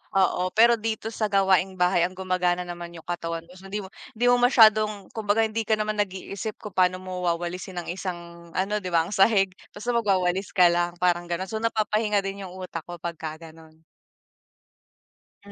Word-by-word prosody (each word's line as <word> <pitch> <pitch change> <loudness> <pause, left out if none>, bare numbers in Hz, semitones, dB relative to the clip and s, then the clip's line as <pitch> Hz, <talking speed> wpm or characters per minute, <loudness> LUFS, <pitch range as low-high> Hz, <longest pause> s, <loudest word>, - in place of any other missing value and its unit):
oo, 185 -1 +2
pero 235 +1 +6
dito 220 0 -3
sa 220 -1 -1
gawaing 195 -1 +2
bahay 180 -1 +3
ang 185 - -14
gumagana 180 -1 0
naman 175 -1 -8
'yung 165 - -11
katawan 165 -1 -4
mo. 170 - -19
So, 195 - -12
hindi 205 +1 -4
mo 190 - -11 0.2
hindi 240 +3 0
mo 245 - +4
masyadong, 215 -5 +4
kumbaga 220 0 +1
hindi 220 0 -2
ka 220 - +4
naman 215 0 -2
nag-iisip 200 +2 -3
kung 210 - -9
paano 185 0 +1
mo 185 -1 -5
wawalisin 175 +1 -3
ang - - -5
isang 170 -2 -7
ano, 200 +3 0
'di 185 - -7
ba, 170 -2 +2
ang 170 - -8
sahig, 195 -1 +4 0.2
basta 215 +4 -3
magwawalis 190 -4 0
ka 180 -2 +6
lang, 175 0 0
parang 175 -1 +2
gano'n. 175 +2 -3
So, 220 - -2
napapahinga 215 -2 +1
din 195 0 -5
'yung 180 - -11
utak 180 -3 -7
ko 175 - -6
pagka 160 -2 -5 0.2
ganun. 160 0 -18 1.6
Mm, - - -12
190 Hz, 190 wpm, -25 LUFS, 175-210 Hz, 1.6 s, pero